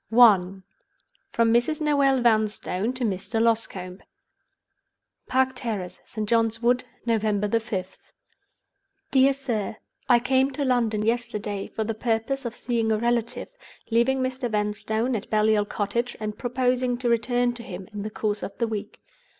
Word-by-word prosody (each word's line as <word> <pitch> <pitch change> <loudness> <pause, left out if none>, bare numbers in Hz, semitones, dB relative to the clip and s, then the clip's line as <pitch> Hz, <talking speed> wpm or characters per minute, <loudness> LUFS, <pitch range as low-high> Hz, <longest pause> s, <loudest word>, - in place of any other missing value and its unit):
I. 195 -5 +5 0.7
From 230 -1 +3
Mrs. 245 +6 +2
Noel 280 -4 +3
Vanstone 215 -2 +1
to 255 0 -4
Mr. 210 +1 -1
Loscombe. 200 -5 0 1.3
"Park 260 0 +2
Terrace, 210 -8 -4
St. 215 -1 -4
John's 225 0 +2
Wood, 245 +1 +2 0.2
November 215 -3 +1
5th. 205 -4 -2 1.1
"Dear 270 0 +5
Sir, 240 -7 -3 0.3
"I 245 - +7
came 260 +2 +2
to 285 +1 -2
London 230 -4 +1
yesterday 210 -3 -2
for 220 - -3
the 225 +1 -2
purpose 230 +4 -1
of 235 -1 -4
seeing 230 -2 0
a 215 - +2
relative, 235 0 -1 0.4
leaving 250 +4 +3
Mr. 255 -1 -2
Vanstone 220 +3 -1
at 210 - -5
Baliol 215 -1 +3
Cottage, 235 +4 -2
and 215 -1 -4
proposing 250 0 0
to 245 0 -2
return 240 +1 +2
to 240 - -8
him 185 -4 -8
in 205 - -4
the 215 - -4
course 210 -1 -2
of 200 - -6
the 235 - 0
week. 210 -2 -6
230 Hz, 145 wpm, -25 LUFS, 210-245 Hz, 1.3 s, I